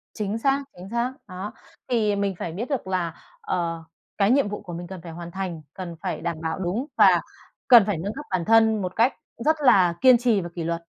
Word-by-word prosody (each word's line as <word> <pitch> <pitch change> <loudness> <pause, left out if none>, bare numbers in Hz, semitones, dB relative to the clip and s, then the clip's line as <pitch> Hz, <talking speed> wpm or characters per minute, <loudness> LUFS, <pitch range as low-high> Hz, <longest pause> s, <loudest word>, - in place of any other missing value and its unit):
Chính 210 0 -2
xác, 275 +3 +1
chính 185 +2 -10
xác. 235 +3 -1
Đó. 185 +3 -6 0.4
Thì 215 -4 +2
mình 200 -1 -1
phải 170 - -4
biết 215 +9 -5
được 265 -9 -2
là, 180 -3 -1 0.3
ờ, 165 -2 -2 0.3
cái 200 +2 +3
nhiệm 275 -3 +3
vụ 210 - -5
của 180 -4 -9
mình 175 +1 -6
cần 190 -2 -8
phải 165 - -8
hoàn 170 +1 -8
thành, 180 -4 -4
cần 180 -3 -7
phải 180 -5 -3
đảm 165 - -3
bảo 160 +3 -3
đúng 190 +8 -2
và - - +6 0.5
cần 240 -5 +9
phải 205 -4 -1
nâng 195 +6 -4
cấp 295 - -8
bản 180 -3 0
thân 220 -1 +4
một 185 0 -4
cách 235 +4 +3 0.3
rất 315 +1 +4
là 180 -7 +6
kiên 255 -1 +7
trì 235 -4 +2
và 175 - -6
kỷ 170 - -3
luật. 170 +1 -2
195 Hz, 230 wpm, -24 LUFS, 175-225 Hz, 0.5 s, cần